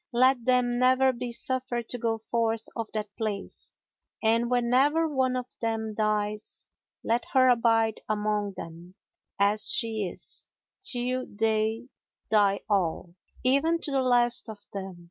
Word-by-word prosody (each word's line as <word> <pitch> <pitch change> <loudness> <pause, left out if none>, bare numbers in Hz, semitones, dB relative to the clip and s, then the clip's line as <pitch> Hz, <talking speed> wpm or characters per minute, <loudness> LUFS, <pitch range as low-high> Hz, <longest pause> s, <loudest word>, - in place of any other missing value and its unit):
Let 255 0 +3
them 250 -1 +2
never 260 +1 +4
be 245 0 -5
suffered 245 -1 -2
to 245 - -1
go 225 -1 0
forth 225 0 -1
of 230 -2 -4
that 210 -1 -4
place, 210 -3 -5 0.5
and 230 +2 +2
whenever 260 +6 +2
one 260 -4 0
of 250 -1 -2 0.2
them 225 -1 -2
dies, 210 0 -2 0.4
let 235 +2 0
her 255 -1 +5
abide 225 -2 +2
among 210 -1 -1
them, 170 +2 -10 0.4
as 200 +1 +2
she 220 -4 +1
is, - - -8 0.3
till 255 -7 +2
they 220 +2 0 0.5
die 200 -2 +3
all, 180 -4 -1 0.3
even 280 +6 +2
to 295 - -2
the 270 -1 +2
last 245 -1 +2
of 215 - -7 0.2
them. 190 -2 -6
230 Hz, 140 wpm, -27 LUFS, 215-255 Hz, 0.5 s, her